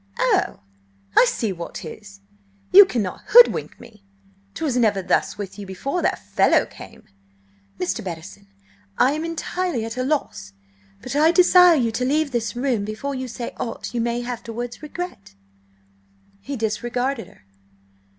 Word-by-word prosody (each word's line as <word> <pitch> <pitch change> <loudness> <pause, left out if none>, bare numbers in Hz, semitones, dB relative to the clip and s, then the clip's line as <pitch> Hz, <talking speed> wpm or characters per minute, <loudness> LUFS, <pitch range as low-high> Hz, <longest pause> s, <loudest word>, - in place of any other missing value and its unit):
"Oh, - - +1 0.5
I - - +7
see 215 -4 -2
what 170 -1 -8
'tis! 200 +4 -10 0.5
You 400 +1 +11
cannot 215 - -3
hoodwink 485 +2 +5
me. 215 -3 -16 0.5
'Twas 300 -6 -2
never 215 -6 +2
thus - - 0
with 205 0 -7
you 200 - -7
before 275 - -3
that - - 0
fellow 100 0 +2
came!" - - -13 0.8
"Mr. 180 +1 -2
Bettison, 130 - -8 0.5
I 260 - +4
am 305 +2 -3
entirely 330 -5 -3
at 225 +2 -6
a 255 - 0
loss, 260 - -3 0.5
but - - -5
I 310 +3 +5
desire 360 -1 +6
you 240 -6 +1
to 235 +3 -2
leave 290 +3 +1
this 240 -1 -2
room 245 -4 0
before 215 +7 -4
you 260 -1 -4
say 240 0 -6
aught 230 +1 -5
you 240 - -1
may 240 +1 -2
afterwards 240 0 -6
regret." 300 - -7 1.0
He 275 +8 -6
disregarded 240 +3 -2
her. - - -21
240 Hz, 150 wpm, -22 LUFS, 205-280 Hz, 1.0 s, You